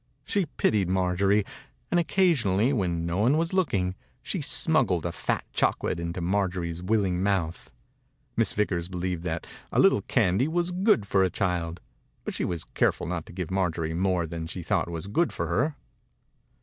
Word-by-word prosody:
She 200 -5 0
pitied 105 -9 +1
Marjorie, 95 +2 +2 0.5
and 175 - +4
occasionally, 140 - +2
when 85 -8 -1
no 85 +2 -1
one 125 +8 +4
was 165 +2 0
looking, 100 - +1 0.3
she - - -3
smuggled 85 -3 +3
a 85 - -1
fat 85 - -2
chocolate - - 0
into 85 +1 -4
Marjorie's 90 -2 -1
willing 95 -2 +1
mouth. 95 -4 -1 0.7
Miss - - +2
Vickers 90 -5 0
believed 90 -1 -3
that 80 -1 -3 0.3
a - - +1
little - - +5
candy 95 +9 +2
was 175 +2 0
good 185 - +3
for 95 -1 +3
a 95 - +2
child, 90 -3 -2 0.4
but - - -4
she - - -2
was 85 -3 -3
careful - - 0
not 85 -2 -4
to - - -10
give 90 -1 -5
Marjorie 85 -4 0
more 90 0 +1
than 80 0 -5
she 85 +1 -6
thought 85 - 0
was 85 0 -5
good 155 - +1
for 85 - -3
her. 125 - 0
95 Hz, 170 wpm, -27 LUFS, 85-105 Hz, 0.7 s, little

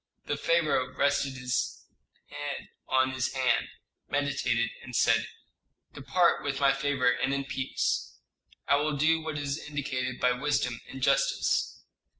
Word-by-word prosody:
The - - -1
pharaoh 155 -6 +1
rested 140 -1 +1
his 125 -1 -2 0.4
head 145 -1 -6 0.2
on 130 0 +3
his 130 -1 -2
hand, 130 -2 +2 0.4
meditated, 135 -5 0
and 125 -1 -8
said, 115 -1 +3 0.7
"Depart 170 +5 +2
with 140 -1 -2
my 140 -1 +4
favor 135 -3 +2
and 130 +2 0
in 140 0 -2
peace. 135 -1 -2 0.5
I 140 - +5
will 150 0 0
do 160 +3 +3
what 155 -1 -4
is 145 +1 -2
indicated 130 -4 -3
by 125 - +3
wisdom 125 -2 -1
and 130 -1 -7
justice." 135 0 +1
135 Hz, 140 wpm, -29 LUFS, 130-145 Hz, 0.7 s, I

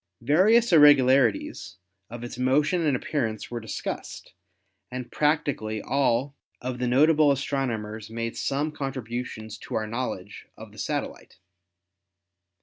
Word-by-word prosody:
Various 205 - +4
irregularities 135 - +4 0.3
of 120 +1 -8
its 120 - -6
motion 150 +7 +2
and 140 - +2
appearance 115 -7 -3
were 120 - -3
discussed, 110 -2 -6 0.6
and 125 -1 -6
practically 145 -8 0
all 135 +2 0 0.2
of 125 0 -5
the 125 - 0
notable 150 +4 +4
astronomers 115 -6 -3
made 115 +1 -4
some 145 +3 -1
contributions 120 -6 -5
to - - -7
our 110 - 0
knowledge 110 -4 -5
of - - -11
the - - -14
satellite. - - -4
130 Hz, 120 wpm, -26 LUFS, 115-145 Hz, 0.6 s, Various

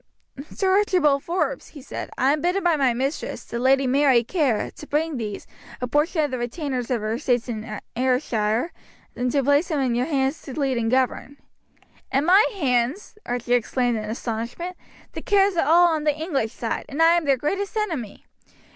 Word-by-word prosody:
"Sir 385 -1 0
Archibald 305 -9 +2
Forbes," 365 +8 -2
he 290 - -12
said, - - -6
"I 265 +3 +3
am 300 - -2
bidden 360 +4 0
by 345 -2 +3
my 270 -4 +2
mistress, 265 +5 -3
the 235 - -5
lady 270 +2 +3
Mary 260 -2 +4
Kerr, 265 - 0
to 300 - -12
bring 305 0 -1
these, 210 -3 -5 0.3
a 250 - -2
portion 305 +5 +1
of 290 - -1
the 255 - -3
retainers 250 0 -3
of 245 -4 0
her 215 +1 -2
estates 245 0 0
in 215 -2 -5 0.2
Ayrshire, 250 +1 0 0.4
and 250 0 -1
to 280 0 +1
place 285 +5 +3
them 310 -5 -1
in 255 -3 +1
your 245 +3 0
hands 275 -1 0
to 275 +1 -7
lead 265 -4 0
and 225 -1 0
govern." 260 +2 0 0.7
"In 275 +3 +1
my 380 +5 +6
hands!" 275 - -1
Archie 245 0 -1
exclaimed 245 -1 +1
in 215 - -5
astonishment. 235 +10 -4 0.4
"The - - -7
Kerrs 395 -2 +3
are 330 - +1
all 345 +1 +6
on 315 -2 -1
the 300 -1 +1
English 280 -9 -2
side, 230 -1 -3
and 285 - -6
I 330 +1 +6
am 340 -2 0
their 275 -2 +3
greatest 395 - -2
enemy. 320 - -3
275 Hz, 190 wpm, -23 LUFS, 245-320 Hz, 0.7 s, my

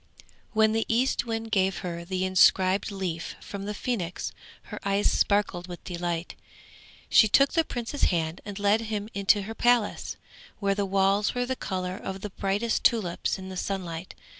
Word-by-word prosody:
When 220 -1 +4
the 225 0 0
Eastwind 225 -2 0
gave 190 -2 +2
her 170 -1 -4
the 185 +1 -2
inscribed 185 +1 +4
leaf 185 -5 -4
from 200 -1 -7
the 210 +1 -4
Phoenix 200 -8 -3 0.3
her - - -8
eyes 200 +1 +2
sparkled 200 -3 +1
with 175 -1 -9
delight. 175 -1 -3 0.7
She 220 - +6
took 275 +6 +4
the 330 - +3
Prince's 245 0 -2
hand 165 0 -1
and 205 -1 -7
led 205 +2 +3
him 215 -1 -4
into 200 +1 +3
her 220 +3 -6
palace, 240 -2 +1 0.4
where 200 -1 +1
the 200 0 -1
walls 195 +3 +2
were 245 0 0
the 260 +1 -2
colour 185 -4 -3
of 195 -1 -6
the 210 - -5
brightest 200 +5 -1
tulips 200 -7 +1
in 190 0 -8
the 190 - -7
sunlight. 180 -3 -4
200 Hz, 165 wpm, -27 LUFS, 185-220 Hz, 0.7 s, She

